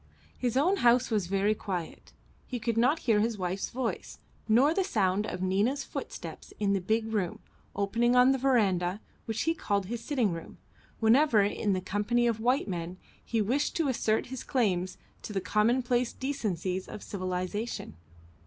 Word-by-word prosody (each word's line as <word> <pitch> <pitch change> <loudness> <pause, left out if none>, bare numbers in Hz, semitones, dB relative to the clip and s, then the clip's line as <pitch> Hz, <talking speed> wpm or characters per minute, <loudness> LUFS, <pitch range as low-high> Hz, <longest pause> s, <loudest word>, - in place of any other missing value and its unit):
His 250 -1 -1
own 360 +8 +3
house 245 -2 +4
was 205 -5 +1
very 200 +3 +2
quiet; 185 -6 -5 0.4
he 250 - -3
could 230 0 -1
not 255 +8 +3
hear 225 -4 +4
his 225 +1 0
wife's 185 +1 -2
voice, 250 -1 -4 0.3
nor 255 +8 +5
the 385 - +1
sound 205 - +1
of 185 - -4
Nina's 210 +10 +1
footsteps - - -7
in 200 -1 +2
the 195 - 0
big 220 +3 0
room, 190 -5 -1 0.4
opening 230 +5 +1
on 250 +1 +6
the 270 - +1
verandah, 200 -8 +2 0.3
which 225 -1 -2
he 325 - +2
called 200 - -1
his 230 +4 -5
sitting 250 -9 +1
room, 165 -1 -7 0.4
whenever, 230 -1 +5
in 205 0 0
the 185 - -1
company 210 +6 0
of 230 -2 +1
white 250 +3 +1
men, 175 -1 -4 0.3
he 225 -2 0
wished 260 +8 0
to 320 -4 +1
assert 220 -3 +1
his 260 - -5
claims 185 -8 0 0.2
to 210 - -7
the 195 - 0
commonplace 240 +4 +1
decencies 190 - -2
of 210 - -8
civilisation. 185 - -4
220 Hz, 170 wpm, -29 LUFS, 195-245 Hz, 0.4 s, on